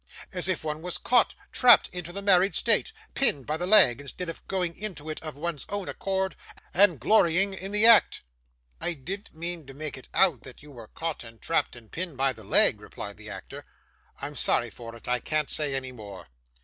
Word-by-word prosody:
As 180 -1 +3
if 185 -3 -1
one 155 0 -4
was 180 +1 -1
caught, 245 -1 +2 0.2
trapped 245 -3 +6
into 175 -1 -7
the 200 +2 -6
married 195 0 +4
state, - - +2 0.2
pinned 145 - +1
by 150 - -2
the 175 +3 -3
leg, 185 - +5
instead 165 +5 -7
of 165 - -7
going 180 -3 -2
into 180 -7 -6
it 155 - -7
of 155 -3 -8
one's 160 -2 -2
own 200 -2 -4
accord 190 -1 -2 0.4
and 180 -6 +4
glorying 190 - +3
in 190 +1 -6
the 210 +1 +3
act!' 230 - +6 0.6
'I 175 - 0
didn't 190 +8 -8
mean 170 -2 -4
to 135 - -11
make 150 -2 -5
it - - -17
out, 170 - +3
that 130 +1 -11
you 150 - -12
were 115 -5 -12
caught 165 +2 -5
and 115 -1 -13
trapped, 165 - -1
and 115 -3 -15
pinned 170 -5 -5
by 135 0 +2
the 110 -2 -13
leg,' - - +4
replied - - -8
the - - -10
actor. - - -9 0.6
'I'm - - -5
sorry - - +2
for 115 -1 -10
it; 115 - -13
I 125 0 +1
can't 155 +1 -1
say 145 -3 0
any 130 -1 -3
more. 100 - -11
165 Hz, 210 wpm, -26 LUFS, 135-190 Hz, 0.6 s, trapped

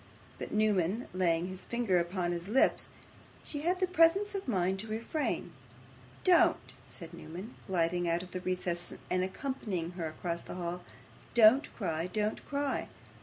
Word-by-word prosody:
But, - - -5
Newman 210 0 +2
laying 175 -2 +2
his 185 0 -6
finger 235 -7 +2
upon 175 0 -1
his 175 +1 -3
lips, 250 +6 +3 0.5
she 290 - -5
had 355 +4 +1
the 375 - +3
presence 365 +3 +4
of 390 -5 -4
mind 190 -4 +1
to 220 - -3
refrain. 230 - -2 0.7
'Don't,' 355 -2 +4
said 170 0 -9
Newman, 170 +7 -8
gliding 175 -1 +1
out 170 +1 +1
of 180 - -12
his 185 0 -4
recess, 180 -1 -2 0.2
and 180 0 +2
accompanying 190 - -3
her 175 -3 -4
across 170 +2 -3
the - - -8
hall. 175 0 -3 0.5
'Don't 240 +5 +7
cry, 165 -5 -1
don't 210 +3 -1
cry. 285 -1 -1
185 Hz, 155 wpm, -32 LUFS, 175-240 Hz, 0.7 s, Don't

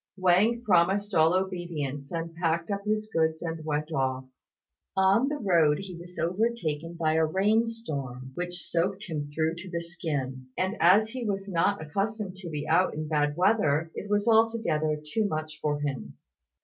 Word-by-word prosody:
Wang 195 +6 +3
promised 195 +1 +2
all 160 -1 +5
obedience, 170 -7 -3
and 165 -1 -4
packed 165 +2 -1
up 200 0 -2
his 215 0 0
goods 160 0 +1
and 160 -1 -4
went 155 +1 -2
off. 130 -2 -1 0.7
On 195 +7 +4
the 295 - -2
road 170 - +3
he 195 -2 -7
was 175 +1 -11
overtaken 170 -4 -1
by 160 -2 +1
a 160 0 +3
rain 205 +8 +2
storm 140 - -5
which 175 +3 -4
soaked 185 +4 -1
him 150 -4 -4
through 160 +2 0
to 190 +2 -8
the 170 -1 -2
skin; 145 -7 -4
and 190 +3 0
as 195 +6 +5
he 250 +1 -5
was 195 -2 -2
not 195 0 +1
accustomed 195 +4 -2
to 185 -3 -7
be 150 -2 -4
out 170 +3 +3
in 155 0 -4
bad 150 -1 +1
weather, 170 -5 +2
it 205 - -6
was 205 +1 +1
altogether 220 -10 +2
too 220 -2 +2
much 155 -3 -4
for 145 -1 0
him. 135 - -4
170 Hz, 175 wpm, -28 LUFS, 155-200 Hz, 0.7 s, all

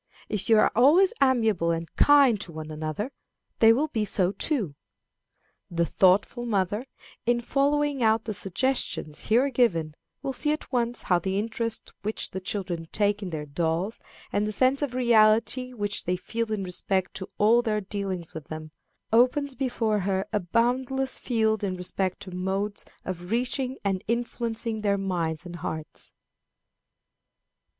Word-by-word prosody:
If 200 -1 -3
you 225 - +7
are - - +4
always 310 - +5
amiable 225 -10 +3
and 165 0 -1
kind 275 -7 +5
to 180 - -5
one 155 -1 -7
another, 155 - -4 0.5
they 225 0 +8
will 285 +7 +2
be 220 -6 -1
so 190 -3 +1
too." 205 - -1 1.0
The 170 -1 +1
thoughtful 195 +7 +3
mother, 205 +3 0 0.4
in 240 0 +3
following 285 +2 +1
out 220 0 +3
the 215 - -4
suggestions 195 - -1
here 250 +5 +3
given, 170 -12 +1 0.3
will 270 - -2
see 295 +4 +1
at 305 - -7
once 240 -1 -1
how 180 -2 +3
the 190 +2 -2
interest 230 +1 -3
which 215 +2 -3
the 190 - -5
children 185 -4 -4
take 205 0 +1
in 195 - -4
their 155 -3 -4
dolls, 165 +7 -1 0.3
and 205 +1 +1
the - - -2
sense 260 +6 +2
of 275 -4 -2
reality 235 +1 +3
which 205 -4 -3
they 180 - +1
feel 225 +4 -3
in 210 -2 -1
respect 185 +1 -1
to 190 - -7
all 225 +3 +5
their 215 -3 0
dealings 195 -4 -4
with 155 -3 -7
them, 155 -1 -7 0.4
opens 255 +4 +3
before 240 -5 0
her 190 0 0
a 210 - +2
boundless 250 +7 0
field 220 -3 +1
in 190 -2 -1
respect 185 +1 -2
to 195 -2 -8
modes 195 +3 -2 0.2
of 175 -1 -5
reaching 255 +3 -1
and 190 -2 0
influencing 230 -1 -2
their 200 -1 +2
minds 170 -5 -2
and 175 0 -7
hearts. 155 -2 -6
210 Hz, 160 wpm, -26 LUFS, 185-240 Hz, 1.0 s, they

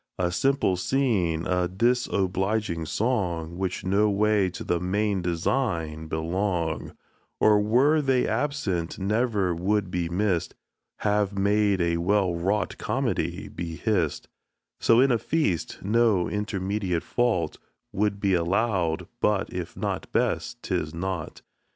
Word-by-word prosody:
A 90 -1 0
simple 135 -3 +1
scene, 90 -9 +1
a 90 -1 +1
disobliging 95 -4 0
song, 90 - -1
Which 95 -1 -3
no 100 +3 +3
way 105 -1 +2
to 90 - -7
the 85 - 0
main 100 +2 0
design 85 -3 -1
belong, 85 +1 -2 0.4
Or 105 -1 +5
were 130 +9 +3
they 130 -3 +2
absent 110 - -1
never 105 -2 +1
would 95 +2 0
be 85 -2 -1
miss'd, 90 -2 0 0.5
Have 105 -1 +1
made 100 -1 +2
a 85 0 +1
well 95 +1 +2
wrought 95 +4 -1
comedy - - -1
be 85 -1 -6
hiss'd; 90 -6 -1 0.5
So 115 0 +4
in 135 +1 +5
a 120 - +2
feast, 145 - -1
no 110 -3 +3
intermediate 100 -3 -2
fault 100 -11 0 0.3
Will 105 +2 +2
be 100 -1 -1
allow'd; 90 -1 0
but - - +1
if - - -5
not - - -3
best, 120 - -1
'tis 85 -4 -2
nought. 90 -2 -4
95 Hz, 125 wpm, -26 LUFS, 85-105 Hz, 0.5 s, Or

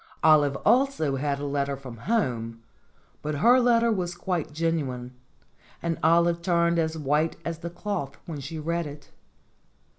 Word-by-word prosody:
Olive 150 -3 +5
also 235 - +3
had 140 0 -1
a 145 - -4
letter 140 -1 -1
from 130 -3 -9
home, 115 - -2 0.6
but 150 0 -3
her 240 - +5
letter 235 -1 +3
was 180 -4 -2
quite 175 -3 -2
genuine, 145 -6 -2 0.7
and 170 -1 -2
Olive 170 +1 +3
turned 170 -1 +2
as 160 0 -1
white 150 +2 +1
as 165 -1 -3
the 170 - -5
cloth 175 -5 -4
when 160 -4 -6
she 140 +4 -6
read 170 +1 -2
it. 145 -1 -11
160 Hz, 150 wpm, -26 LUFS, 140-170 Hz, 0.7 s, Olive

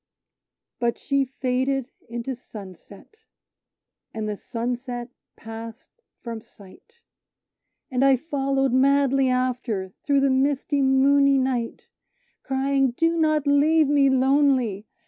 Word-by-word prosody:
But 235 -1 0
she 275 -1 0
faded 260 0 -2 0.2
into 235 +3 -4
sunset, 205 - -13 1.0
and 215 -1 -3
the 210 - -3
sunset 245 +2 -5 0.2
passed 225 +1 -10 0.3
from 230 -2 -7
sight; 230 - -19 0.9
And 255 +1 +1
I 275 -1 +5
followed 270 -2 -1
madly 275 0 +3
after, 245 -7 -2
through 280 -1 +2
the 275 -1 +3
misty, 280 +1 +1
moony 275 +1 +4
night, 255 -3 -2 0.6
Crying, 270 -1 0
"do 330 0 +2
not 310 -2 +1
leave 290 +1 +3
me 285 -2 +4
lonely! 260 -6 +2
265 Hz, 105 wpm, -24 LUFS, 240-275 Hz, 1.0 s, I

